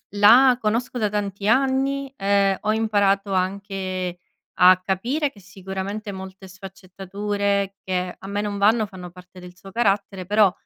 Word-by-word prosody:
La 240 Hz, +5 st, +6 dB
conosco 235 Hz, +3 st, -1 dB
da 215 Hz, -3 st, +1 dB
tanti 200 Hz, -1 st, -3 dB
anni 270 Hz, +2 st, +1 dB
e 195 Hz, -1 st, +2 dB
ho 215 Hz, -, 0 dB
imparato 205 Hz, -2 st, +1 dB
anche 185 Hz, -1 st, -3 dB, 0.4 s
a 185 Hz, 0 st, +7 dB
capire 245 Hz, -, -1 dB
che 205 Hz, -, -18 dB
sicuramente 195 Hz, +2 st, -6 dB
molte 190 Hz, 0 st, -10 dB
sfaccettature 195 Hz, +1 st, -3 dB
che 180 Hz, -1 st, -2 dB
a -, -, -11 dB
me 200 Hz, +1 st, -3 dB
non 205 Hz, -1 st, -3 dB
vanno, 215 Hz, +2 st, +3 dB
fanno 185 Hz, -3 st, -10 dB
parte 180 Hz, +1 st, -15 dB
del 180 Hz, 0 st, -13 dB
suo 195 Hz, -, -13 dB
carattere 200 Hz, -4 st, 0 dB
però, 205 Hz, -1 st, +4 dB
200 Hz, 145 wpm, -22 LUFS, 190-215 Hz, 0.4 s, a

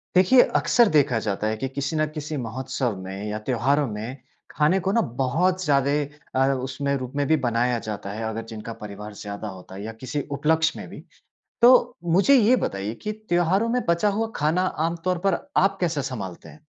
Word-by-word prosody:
देखिए, 245 Hz, +8 st, +7 dB
अक्सर 240 Hz, -1 st, +4 dB
देखा 145 Hz, -6 st, +3 dB
जाता 105 Hz, 0 st, -2 dB
है 110 Hz, 0 st, -1 dB
कि 135 Hz, -, -2 dB
किसी 140 Hz, +3 st, -3 dB
न 155 Hz, 0 st, +2 dB
किसी 155 Hz, 0 st, -5 dB
महोत्सव 125 Hz, -1 st, -3 dB
में 95 Hz, +2 st, -6 dB
या 105 Hz, -, -3 dB
त्योहारों 135 Hz, +5 st, +1 dB
में 110 Hz, +5 st, -6 dB, 0.3 s
खाने 155 Hz, +6 st, +2 dB
को 195 Hz, -, +2 dB
ना 230 Hz, -, +3 dB, 0.2 s
बहुत 180 Hz, +8 st, +1 dB
ज्यादे 140 Hz, -1 st, +2 dB, 0.4 s
अ, 135 Hz, +1 st, +3 dB
उसमें 135 Hz, +2 st, -2 dB
रूप 130 Hz, -1 st, -6 dB
में 145 Hz, 0 st, +1 dB
भी 160 Hz, -, +4 dB
बनाया 120 Hz, +1 st, +1 dB
जाता 105 Hz, -3 st, -6 dB
है 110 Hz, +2 st, -5 dB
अगर 110 Hz, +1 st, -4 dB
जिनका 115 Hz, 0 st, -7 dB
परिवार 105 Hz, 0 st, -8 dB
ज़्यादा 100 Hz, +1 st, -6 dB
होता 95 Hz, -1 st, -10 dB
है 100 Hz, -, -7 dB
या 110 Hz, -, -5 dB
किसी 140 Hz, +3 st, -2 dB
उपलक्ष्य 160 Hz, +3 st, +1 dB
में -, -, -7 dB
भी। -, -, -10 dB, 0.6 s
तो 245 Hz, +2 st, +9 dB, 0.4 s
मुझे 200 Hz, +10 st, +5 dB
ये 245 Hz, 0 st, +5 dB
बताइए 100 Hz, +2 st, -3 dB
कि 210 Hz, -, -2 dB, 0.2 s
त्योहारों 175 Hz, +6 st, +2 dB
में 250 Hz, +1 st, +1 dB
बचा 170 Hz, +5 st, +3 dB
हुआ 220 Hz, +2 st, -1 dB
खाना 155 Hz, +4 st, +1 dB, 0.3 s
आम 170 Hz, -, -2 dB
तौर 185 Hz, -1 st, +1 dB
पर 190 Hz, -, +3 dB, 0.2 s
आप 195 Hz, +1 st, +3 dB
कैसे 165 Hz, -5 st, 0 dB
संभालते 110 Hz, -10 st, -6 dB
हैं? 155 Hz, 0 st, -17 dB
140 Hz, 195 wpm, -24 LUFS, 110-170 Hz, 0.6 s, तो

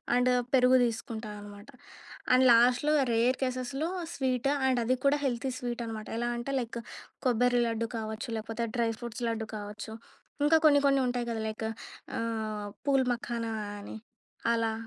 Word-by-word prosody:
And 250 Hz, +1 st, +3 dB, 0.2 s
పెరుగు 255 Hz, -1 st, +6 dB
తీసుకుంటా 225 Hz, -1 st, -3 dB
అనమాట. 205 Hz, +3 st, -11 dB, 0.6 s
అండ్ 255 Hz, +1 st, +6 dB
లాస్ట్‌లో, 245 Hz, +5 st, +5 dB, 0.2 s
రేర్ 235 Hz, +3 st, +3 dB
కేసెస్‌లో 260 Hz, +4 st, -1 dB, 0.3 s
స్వీట్ 260 Hz, -1 st, 0 dB, 0.2 s
అండ్ 255 Hz, -2 st, +2 dB
అది 255 Hz, +3 st, +2 dB
కూడా 280 Hz, +1 st, +5 dB
హెల్తీ 260 Hz, +1 st, -1 dB
స్వీట్ 240 Hz, -2 st, -4 dB
అన్నమాట. 220 Hz, -1 st, -6 dB
ఎలా 240 Hz, +1 st, -1 dB
అంటే 240 Hz, +3 st, -4 dB
లైక్ 235 Hz, -1 st, -4 dB, 0.5 s
కొబ్బరి 245 Hz, 0 st, +3 dB
లడ్డు 230 Hz, 0 st, -1 dB
కావచ్చు, 220 Hz, +3 st, -5 dB
లేపోతే 225 Hz, +1 st, -3 dB
డ్రై 230 Hz, -1 st, +2 dB
ఫ్రూట్స్ 240 Hz, 0 st, -6 dB
లడ్డు 225 Hz, -1 st, -3 dB
కావచ్చు. 210 Hz, +1 st, -7 dB, 0.5 s
ఇంకా 320 Hz, +1 st, +5 dB
కొన్ని 285 Hz, -2 st, +6 dB
కొన్ని 275 Hz, -1 st, +4 dB
ఉంటాయి 245 Hz, -1 st, -1 dB
కదా! 220 Hz, -1 st, -2 dB
లైక్ 220 Hz, +1 st, -4 dB, 0.5 s
ఆహ్, 220 Hz, -2 st, -3 dB, 0.2 s
పూల్ 270 Hz, -2 st, +4 dB
మఖానా 235 Hz, -1 st, -3 dB, 0.3 s
అని 205 Hz, -, -8 dB, 0.6 s
అలా. 225 Hz, -1 st, +1 dB
240 Hz, 150 wpm, -30 LUFS, 225-255 Hz, 0.6 s, పెరుగు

